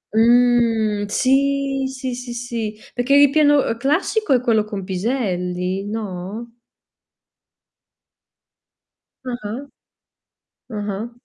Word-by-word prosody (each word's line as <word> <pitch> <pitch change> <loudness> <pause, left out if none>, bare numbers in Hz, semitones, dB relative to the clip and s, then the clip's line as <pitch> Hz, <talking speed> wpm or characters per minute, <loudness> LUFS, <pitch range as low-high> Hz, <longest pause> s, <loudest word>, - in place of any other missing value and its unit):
Mh, 230 -3 +3
sì, 275 +2 +1
sì, 260 -1 -5
sì, 245 0 -6
sì, 230 -3 -4
perché 250 +3 +2
il 285 - +7
ripieno 290 -3 +3
classico 315 - 0
è 250 - +3
quello 230 -4 +2
con 205 -2 -6
piselli, 185 -2 -2
no? 215 +2 -5 2.8
Ah-ah. 235 +1 -5 1.2
Ah-ah. 205 +3 -4
235 Hz, 85 wpm, -21 LUFS, 210-265 Hz, 2.8 s, il